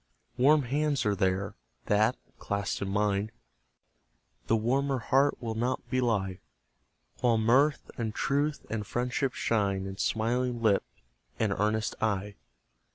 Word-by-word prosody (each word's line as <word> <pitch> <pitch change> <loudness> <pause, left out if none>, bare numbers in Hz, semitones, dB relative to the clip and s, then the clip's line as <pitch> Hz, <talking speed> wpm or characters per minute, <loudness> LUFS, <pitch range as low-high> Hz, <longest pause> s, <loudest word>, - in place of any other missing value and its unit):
Warm 145 +3 +5
hands 145 +2 0
are 105 - +2
there, 95 0 0 0.3
that, 110 +4 +2 0.2
clasped 100 0 -2
in 100 - -2
mine, 100 +1 0 1.2
The 115 - +3
warmer 135 +5 +1
heart 135 +4 +2
will 115 -3 -3
not 120 +3 -2
belie; 110 -8 0 0.8
While 120 -2 +3
mirth 130 +7 +2
and 110 -2 -1
truth, 145 +1 0
and 110 -2 -3
friendship 125 +2 -1
shine 100 -4 0
In 95 0 -6
smiling 120 +3 0
lip 110 -4 +3 0.5
and 105 -3 +1
earnest 105 +2 0
eye. 105 -1 -1
115 Hz, 125 wpm, -29 LUFS, 100-130 Hz, 1.2 s, Warm